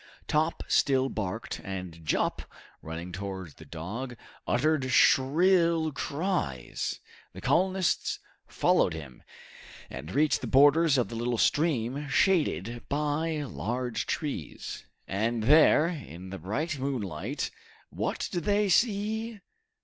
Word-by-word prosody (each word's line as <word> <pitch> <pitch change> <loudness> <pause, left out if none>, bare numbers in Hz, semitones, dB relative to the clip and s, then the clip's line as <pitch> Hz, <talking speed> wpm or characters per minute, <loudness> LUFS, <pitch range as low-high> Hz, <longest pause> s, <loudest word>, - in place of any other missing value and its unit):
Top 155 +2 +1
still 135 -1 +3
barked, 110 0 -4
and 90 -4 -6
Jup, 75 - 0 0.4
running 80 +3 -6
towards 95 -3 -6
the - - -14
dog, 115 +10 -6 0.3
uttered 145 0 +1
shrill 165 +4 +4
cries. 140 - -2 0.3
The - - -9
colonists 185 0 +1 0.3
followed - - +2
him, 75 -6 -9 0.7
and 75 - -7
reached 150 +8 +2
the - - -4
borders 145 +2 +5
of 125 - +1
the 115 - -6
little 120 +1 -1
stream, 145 -1 +1
shaded 135 - +1
by 150 +2 0
large 125 -2 -3
trees. 140 - -4 0.2
And 110 +3 -1
there, 150 +4 +6
in 95 - -8
the 95 - -6
bright 140 - -2
moonlight, 120 - -3 0.4
what - - -2
did 175 -4 -3
they 205 0 +2
see? 220 +2 +1
135 Hz, 115 wpm, -28 LUFS, 100-160 Hz, 0.7 s, there